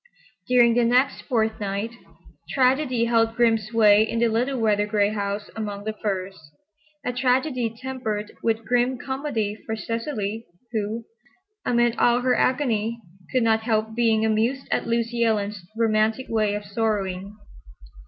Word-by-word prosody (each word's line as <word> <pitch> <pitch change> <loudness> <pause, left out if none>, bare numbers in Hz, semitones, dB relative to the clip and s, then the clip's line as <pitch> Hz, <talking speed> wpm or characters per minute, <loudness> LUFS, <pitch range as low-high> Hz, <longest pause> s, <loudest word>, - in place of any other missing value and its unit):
During 240 -2 +5
the 240 +1 +3
next 250 +4 +2
fortnight 220 -3 -1 0.6
tragedy 255 -2 +2
held 225 -1 +2
grim 230 -2 +3
sway 215 -1 +4
in 220 +1 0
the 235 0 +3
little 250 +4 0
weather 210 -2 +2
gray 205 -1 +2
house 205 -1 -3
among 205 -2 -4
the 220 +1 -3
firs—a 205 - -7
tragedy 255 -1 +1
tempered 235 -5 -4
with 225 0 0
grim 245 +1 +1
comedy 265 -6 -2
for 220 - -3
Cecily, 225 -1 -4 0.2
who, 220 +1 -3 0.6
amid 240 -1 +2
all 240 +1 +4
her 250 0 +2
agony, 235 -4 +1 0.3
could 255 -2 +2
not 220 -1 +3
help 220 -1 0
being 225 -2 +2
amused 225 +5 0
at - - 0
Lucy 235 0 0
Ellen's 210 -3 0
romantic 220 +2 +1
way 215 -2 +1
of 205 0 -5
sorrowing. 200 -2 -2
225 Hz, 135 wpm, -24 LUFS, 210-245 Hz, 0.6 s, During